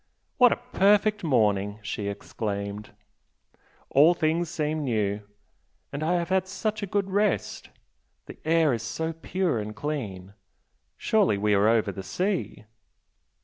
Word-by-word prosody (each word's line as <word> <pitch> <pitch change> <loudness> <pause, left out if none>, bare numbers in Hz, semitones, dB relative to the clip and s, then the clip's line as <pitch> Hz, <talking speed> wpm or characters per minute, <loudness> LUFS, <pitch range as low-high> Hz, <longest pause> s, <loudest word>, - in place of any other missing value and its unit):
"What 250 -2 +7
a - - +3
perfect 210 -3 +2
morning!" 105 -8 +1
she 105 0 -4
exclaimed 100 0 -5 1.0
"All 155 +6 +6
things 165 +1 0
seem 155 -2 -2
new! 105 -5 -1 0.7
And 140 - -4
I 160 +3 +1
have 175 0 -1
had 190 0 +1
such 210 +2 -3
a 200 - -3
good 195 0 -1
rest! 205 0 0 0.6
The - - -11
air 160 -3 +3
is 115 - -2
so 160 +8 -3
pure 165 -4 -1
and 105 0 -6
clean 105 -10 -5 0.6
surely 205 - +2
we 105 +1 +1
are 100 +1 +4
over 110 -2 +2
the 95 - -7
sea?" 185 - -3
155 Hz, 140 wpm, -26 LUFS, -, 1.0 s, What